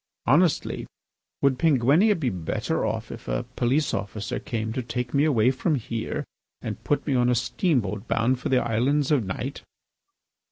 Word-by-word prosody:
Honestly, 155 +5 +2 0.6
would 135 -2 +3
Penguinia 160 - +4
be 130 -6 0
better 90 -4 -2
off - - -2
if - - -9
a - - -1
police 135 +5 +1
officer 100 0 -3
came 110 -1 -3
to 130 - -2
take 125 0 -4
me 140 +1 +3
away 125 -5 +4
from 135 +4 0
here 115 -3 -3 0.3
and - - -6
put 145 - 0
me 145 - 0
on 125 -1 +3
a 125 - +3
steamboat 115 - 0
bound 125 +3 +1
for - - -3
the 130 -1 +3
Islands 130 +6 +1
of 140 -6 +3
Night?" 120 +9 -4
125 Hz, 165 wpm, -25 LUFS, 115-145 Hz, 0.6 s, Penguinia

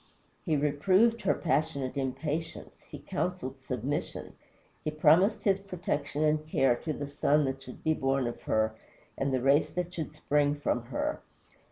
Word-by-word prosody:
He 155 -3 +2
reproved 185 +11 +3
her - - +2
passionate 145 -4 -1
impatience; 145 +4 -4
he - - -7
counseled 135 -8 -3
submission; 130 +3 -3 0.5
he - - -1
promised 160 +7 +4
his 195 -2 +3
protection 165 -6 -3
and 155 0 +2
care 135 -5 +3
to 160 - -4
the 145 -1 -4
son 145 +1 +2
that 135 0 -3
should 125 -1 -11
be 160 - +3
born 135 -2 0
of 120 - -4
her 110 0 +2 0.4
and 135 0 -1
the 130 -2 0
race 140 +2 +4
that 180 0 -3
should 155 -3 -5
spring 145 -1 +1
from 125 -5 -1
her. 120 0 -2
145 Hz, 160 wpm, -30 LUFS, 135-160 Hz, 0.5 s, promised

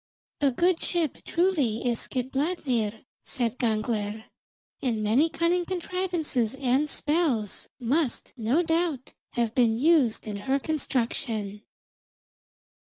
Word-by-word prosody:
"A 285 -2 +4
good 345 +7 +2
ship 335 -6 0
truly, 300 - +1
is 235 -2 +1
Skidbladnir," 255 - -1 0.2
said 240 -2 -2
Gangler, 215 -2 -1 0.6
"and 225 -5 0
many 250 +10 +3
cunning 340 +2 +1
contrivances 345 - -1
and 270 +3 +1
spells 290 - 0
must, 260 +2 0
no 250 +8 +1
doubt, 325 -5 0 0.2
have 235 -2 0
been 235 -3 +3
used 285 -4 +3
in 210 -2 -4
her 265 +7 0
construction." 235 -8 -2
260 Hz, 105 wpm, -27 LUFS, 225-325 Hz, 0.6 s, A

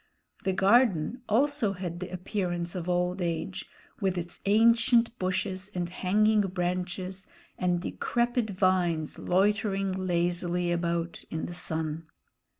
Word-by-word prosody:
The 190 - +2
garden 205 +1 +3
also 245 -2 +2
had 175 -2 -5
the 180 - -5
appearance 175 -2 -3
of 180 -2 -4
old 180 +1 0
age, 170 +2 -2 0.3
with 190 -2 0
its 175 0 -4
ancient 230 +2 +4
bushes 185 +1 -2
and 175 -1 -2
hanging 210 +4 +3
branches 185 0 -3 0.3
and 180 -1 +1
decrepit 240 +3 -1
vines 180 -5 +1
loitering 195 +1 +1
lazily 175 -1 0
about 170 0 -1
in 160 - -3
the 175 - -6
sun. 160 -2 -2
185 Hz, 120 wpm, -28 LUFS, 175-200 Hz, 0.3 s, ancient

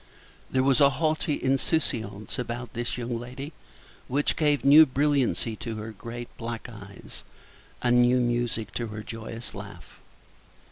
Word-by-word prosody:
There 130 0 +2
was 135 -1 +4
a 140 - +8
haughty 155 +1 0
insouciance 130 -6 0
about 120 -1 -4
this 120 +1 -2
young 120 -1 -3
lady 130 +5 -7 0.5
which 145 +3 +1
gave 150 -3 +2
new 150 +3 +9
brilliancy 135 -4 +1
to 115 -2 -5
her 110 +1 -6
great 120 +3 -8
black 115 -1 -5
eyes, 100 -4 -11 0.6
and 120 0 +5
new 120 +1 +5
music 120 -2 -1
to 120 - -2
her 110 0 -6
joyous 115 +1 -7
laugh. - - -10
120 Hz, 140 wpm, -27 LUFS, 115-135 Hz, 0.6 s, new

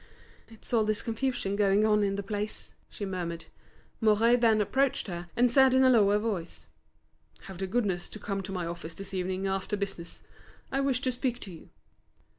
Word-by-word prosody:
"It's 225 +2 -11
all 225 -2 +4
this 215 0 0
confusion 230 -3 -2
going 200 +1 +3
on 210 -1 +3
in 195 -1 0
the 200 - -3
place," 210 +1 -4 0.2
she 205 - -6
murmured. 170 -3 -4 0.6
Mouret 225 +2 +4
then 225 -2 +4
approached 265 +6 +1
her 175 -2 -6
and 245 0 +4
said 265 0 +5
in 260 - +5
a 260 - +6
lower 205 -4 +5
voice: 210 -6 -4 0.8
"Have 190 -2 -10
the 190 - -2
goodness 190 -5 -1
to - - -8
come 195 -1 -3
to 195 - -7
my 180 -3 -3
office 165 -1 -6
this 195 0 -8
evening 185 +1 -2
after 195 +2 -1
business. 195 -4 -5 0.5
I 270 - 0
wish 270 -2 +1
to 255 - 0
speak 245 0 -2
to 195 - -7
you." 165 - -13
205 Hz, 190 wpm, -29 LUFS, 190-230 Hz, 0.8 s, a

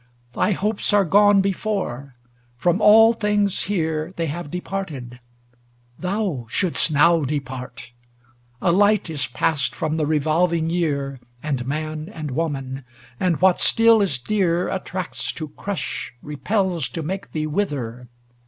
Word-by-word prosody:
Thy 210 - +1
hopes 210 +2 -1
are 205 -1 +4
gone 205 +3 +5
before; 190 - -3 0.4
from 175 - +1
all 225 +2 +7
things 210 -3 0
here 160 -3 -2
They 165 - 0
have 160 +1 -5
departed; 155 -9 -5 0.8
thou 180 - -2
shouldst 175 - +2
now 160 +3 +4
depart! 130 -3 -5 0.7
A 175 - +4
light 205 -1 +3
is 145 -3 -2
passed 140 +2 -1
from 160 0 -2
the 155 -2 0
revolving 160 +2 +1
year. 140 -6 -1 0.2
And 135 -5 -2
man, 155 +3 -4
and 155 -7 -6
woman; 135 -3 -3 0.4
and 180 -4 +1
what 185 -1 +4
still 225 -1 +5
is 185 -10 +1
dear 180 +3 0
Attracts 185 -1 -3
to 155 -2 -6
crush, 195 +6 -4
repels 175 +5 -1
to 165 - -5
make 190 +5 -5
thee 155 -1 -2
wither. 140 - -3
165 Hz, 135 wpm, -22 LUFS, 145-195 Hz, 0.8 s, all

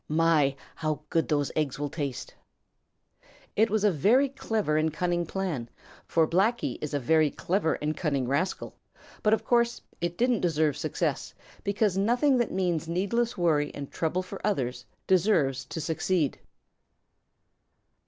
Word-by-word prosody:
My, 155 -3 +3 0.2
how 155 -2 -2
good 165 - +1
those 145 -2 0
eggs 150 -4 -1
will 145 -1 -3
taste!" 140 -6 -4 1.2
It 220 +2 +3
was 215 -1 0
a 210 - +5
very 230 - +3
clever 220 - -1
and 155 +1 +2
cunning 175 +1 -1
plan, 160 -11 -3 0.4
for 165 -1 +3
Blacky 210 +9 +1
is 150 -1 -3
a - - +1
very 155 +4 +3
clever 175 +2 0
and 150 +1 -2
cunning 140 -6 -1
rascal, 155 +8 -1 0.5
but 210 - +2
of 220 - +2
course 235 -1 +2 0.2
it 175 0 -2
didn't 245 -2 +2
deserve 155 -4 +1
success - - -2 0.3
because 200 -1 +1
nothing 245 +6 +3
that 240 - 0
means 175 -4 -1
needless 225 +8 0
worry 155 -4 +2
and 140 -1 -7
trouble 175 +3 -1
for 180 - -8
others 125 -11 -1 0.2
deserves 165 -9 +2
to - - -6
succeed. 160 -1 0
170 Hz, 145 wpm, -28 LUFS, 150-200 Hz, 1.2 s, a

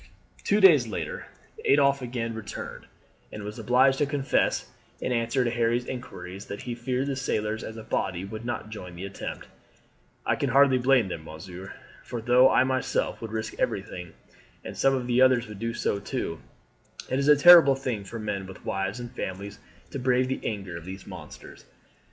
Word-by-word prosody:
Two 205 - +3
days 160 - +7
later 110 - -5 0.4
Adolphe 140 -1 +4
again 120 -2 -3
returned, 110 -2 -7 0.4
and 105 - -7
was 105 +3 -7
obliged 130 +4 +4
to 145 - +2
confess 140 -1 +1 0.3
in - - -2
answer 120 +2 +1
to 120 - 0
Harry's 120 +1 +1
inquiries 100 -7 -7
that 100 - -6
he 120 - -4
feared 125 +2 -2
the 140 -1 -2
sailors 110 -4 -2
as 110 - -7
a 110 - -7
body 90 -4 -2
would 110 +3 -7
not 120 -2 -4
join 90 -4 -8
in - - -11
the 90 +3 -6
attempt. 100 - -6 0.8
"I - - +2
can 140 - 0
hardly 135 0 +5
blame 125 -4 +4
them, 85 -3 -6
monsieur. 90 +4 -9 0.3
For 120 - -5
though 125 +3 +5
I - - +4
myself 130 0 -1
would 115 -2 -6
risk 110 0 -3
everything, 90 -2 -3 0.5
and - - -6
some 135 0 +3
of 130 -2 -2
the 125 +1 +2
others 130 -2 +5
would 105 -2 -9
do 115 +1 -2
so 105 -3 -1
too, 100 - -4 0.7
it 130 - 0
is 140 - 0
a 150 - +8
terrible 160 -2 +9
thing 125 -6 -3
for 115 +4 -7
men 105 -3 -3
with 95 - -12
wives 95 +4 -2
and 120 -1 -7
families 100 -3 -6 0.3
to 140 - -4
brave 125 0 +2
the 130 - -3
anger 95 -5 -4
of 85 - -10
these 95 +1 -8
monsters. 90 -6 -11
115 Hz, 190 wpm, -27 LUFS, 100-130 Hz, 0.8 s, terrible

